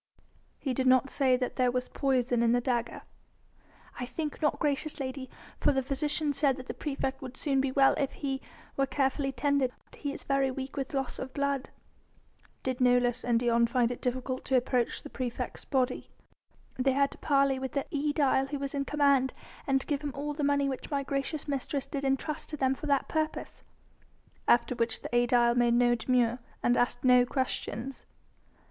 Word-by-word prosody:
"He 265 - -2
did 260 +1 0
not 255 +1 +4
say 265 -3 +3
that 250 0 -3
there 250 -1 +3
was 250 0 -1
poison 255 -3 +1
in 235 0 +4
the 245 - +3
dagger?" 240 -1 -2 1.0
"I 250 - -3
think 305 +2 -4
not, 295 -2 +2
gracious 295 +1 -1
lady; 260 -1 -4 0.3
for - - +3
the 265 -1 0
physician 290 +2 0
said 275 -1 +2
that 260 - -8
the - - -5
praefect 270 -2 -3
would 255 -1 -8
soon 275 -3 +1
be 270 -1 -1
well 270 0 +5
if 275 - 0
he 270 -1 -3 0.3
were 275 0 +1
carefully 270 0 0
tended. 270 0 +1 0.2
He 285 - -4
is - - -8
very 275 -1 +1
weak 265 +1 -5
with 275 0 -3
loss 270 -2 -2
of 260 0 -6
blood." 280 -1 -1 0.9
"Did 260 -1 -2
Nolus 245 -1 +3
and 235 -2 +2
Dion 235 -1 +3
find 240 0 +2
it 245 - -6
difficult 255 +1 -2
to 265 - +3
approach 245 -1 0
the - - -8
praefect's 245 -2 -4
body?" 260 -3 0 0.7
"They 265 +1 +3
had 275 +1 +2
to - - -12
parley 275 -2 +2
with 265 0 -4
the 280 - -1
aedile 285 -2 +2
who 285 +1 -3
was 275 0 -4
in 280 -1 -1
command, 280 -3 +3 0.3
and 270 -1 +3
to - - -6
give 290 -1 -1
him 290 -2 -4
all 295 +1 -3
the 295 0 -3
money 285 0 +2
which 265 -2 -4
my 280 -2 -1
gracious 275 +3 -3
mistress 280 0 -2
did 280 -1 -4
entrust 275 +3 -1
to 300 - -5
them 265 -1 +2
for 300 - -7
that 280 -2 +2
purpose." 310 -1 -3 0.9
"After 240 +1 +4
which 230 -2 -1
the - - -4
aedile 240 0 +4
made 240 -1 +3
no 240 0 +4
demur... 240 +1 +1 0.2
and 240 - +3
asked 245 0 0
no 250 -1 +6
questions?" 260 -1 -3
265 Hz, 190 wpm, -29 LUFS, 250-280 Hz, 1.0 s, no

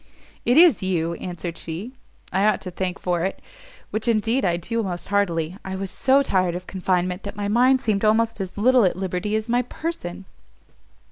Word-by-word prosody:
"It 245 +3 +3
is 330 - +7
you," 170 -3 0
answered 175 -1 -6
she, 170 +9 -6 0.4
"I 195 +2 +2
ought 215 - +2
to 185 - -6
thank 180 0 -3
for 175 -2 -1
it, 190 - -2 0.5
which 220 +1 -2
indeed 230 +3 +2
I 175 -3 +2
do 230 +7 -2
most 180 -4 -5
heartily. 180 -4 0
I 190 0 -5
was 190 -1 -4
so 270 +7 +3
tired 185 -7 +1
of 180 +1 -6
confinement, 180 0 -1
that 200 - -7
my 205 0 -3
mind 250 +5 +4
seemed 210 -2 0
almost 220 0 +2
as 190 0 -6
little 250 +3 +5
at 185 - +2
liberty 190 +2 -2
as 220 +1 -1
my 240 +1 +2
person." 245 - -5
195 Hz, 190 wpm, -23 LUFS, 180-230 Hz, 0.5 s, is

